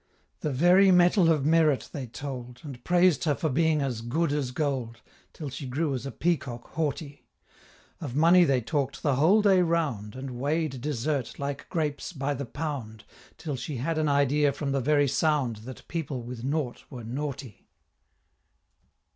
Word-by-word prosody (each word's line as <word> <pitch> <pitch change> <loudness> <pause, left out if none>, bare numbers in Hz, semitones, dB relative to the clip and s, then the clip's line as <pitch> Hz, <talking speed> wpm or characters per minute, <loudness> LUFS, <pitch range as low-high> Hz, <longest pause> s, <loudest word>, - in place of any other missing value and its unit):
The 150 - -2
very 175 +8 +5
metal 180 -1 +5
of 150 -4 +1
merit 155 -3 +3
they 135 -4 -5
told, 125 -1 -7
And 135 -5 -9
praised 175 -3 +3
her 150 -3 +2
for 160 - -1
being 155 +1 +2
as 125 -5 -3
"good 145 +7 0
as 145 -4 -1
gold"! 130 -4 -2 0.3
Till 150 -4 -7
she 130 +1 -6
grew 140 +3 -1
as 130 +1 -4
a - - -5
peacock 135 -4 -2
haughty; 145 -2 -3 0.7
Of 135 -6 -6
money 170 +4 +6
they 135 -6 +2
talk'd 140 +2 -2
the 140 -4 +2
whole 190 +9 +4
day 195 -3 +5
round, 150 - -1
And 130 0 -6
weigh'd 145 -1 -1
desert, 140 -1 -2
like 140 0 -5
grapes, 155 0 -2
by 140 -1 -2
the 140 0 -4
pound, 125 -6 -5 0.3
Till 150 -4 -4
she 130 +2 -5
had 155 +6 -1
an 155 -1 +1
idea 140 +1 +3
from 140 0 -3
the 135 -1 0
very 145 +2 +3
sound 140 -4 +1
That 120 +4 -11
people 145 -7 -4
with 120 0 -7
nought 140 -2 -2
were 125 -3 -8
naughty. 135 -1 -6
145 Hz, 170 wpm, -27 LUFS, 130-160 Hz, 0.7 s, money